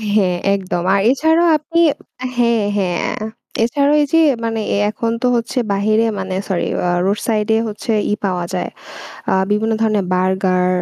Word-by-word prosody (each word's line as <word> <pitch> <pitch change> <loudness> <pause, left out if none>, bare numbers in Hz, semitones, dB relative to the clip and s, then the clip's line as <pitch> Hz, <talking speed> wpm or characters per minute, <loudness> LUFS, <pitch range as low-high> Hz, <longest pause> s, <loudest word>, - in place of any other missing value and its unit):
হ্যাঁ, 185 -4 +2 0.2
একদম। 185 -3 -2
আর 200 - +3
এছাড়াও 320 +5 +3
আপনি 335 +3 -1 0.6
হ্যাঁ, 235 -3 +2
হ্যাঁ। 180 -3 0 0.2
আ - - -3 0.4
এছাড়াও 280 +4 +2
এই - - +3
যে 325 - +6 0.2
মানে 225 -1 -1
এ - - +1
এখন 230 +1 -2
তো 250 - +2
হচ্ছে 245 +3 -1
বাহিরে, 215 +3 +2
মানে 190 -1 -4
সরি 185 -3 -1 0.2
আ - - +1 0.2
রোড 200 +2 0
সাইডে 220 0 +1
হচ্ছে 215 +2 -4 0.2
ই - - +2
পাওয়া 180 -2 -1
যায়। 180 - -2 0.6
আ - - +1 0.2
বিভিন্ন 220 +2 +1
ধরনের 215 -3 +1
বার্গার, 185 0 +1
215 Hz, 165 wpm, -18 LUFS, 190-235 Hz, 0.6 s, যে